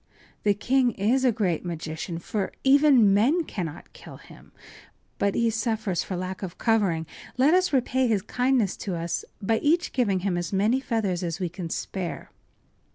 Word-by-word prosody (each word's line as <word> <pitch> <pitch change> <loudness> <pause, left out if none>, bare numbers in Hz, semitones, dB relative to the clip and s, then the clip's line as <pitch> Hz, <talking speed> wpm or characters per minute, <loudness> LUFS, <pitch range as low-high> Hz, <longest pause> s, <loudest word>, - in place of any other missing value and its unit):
The 205 -1 +2
king 250 +3 +2
is 230 +7 +1
a 255 - +4
great 195 -8 -1
magician, 165 0 -5
for 195 +3 -3
even 270 -7 +5
men 270 - +3
cannot 170 - -6
kill - - -12
him. - - -16 0.7
But 200 -1 +1
he 230 -1 +2
suffers 220 -5 -1
for 190 - -5
lack 185 +1 -5
of 185 -3 -6
covering. 200 -8 +1 0.3
Let 275 +5 +4
us 370 -1 +3
repay 260 -1 +1
his 210 -5 +1
kindness 250 -5 +1
to 190 -4 -4
us 170 0 -3 0.2
by 225 +3 +1
each 335 +4 +1
giving 200 -8 +1
him 180 -2 -1
as 175 - -4
many 210 +6 +2
feathers 215 -8 -1
as 170 -2 -3
we 180 -2 -2
can 175 0 -6
spare. 180 +1 -5
205 Hz, 170 wpm, -25 LUFS, 180-250 Hz, 0.7 s, even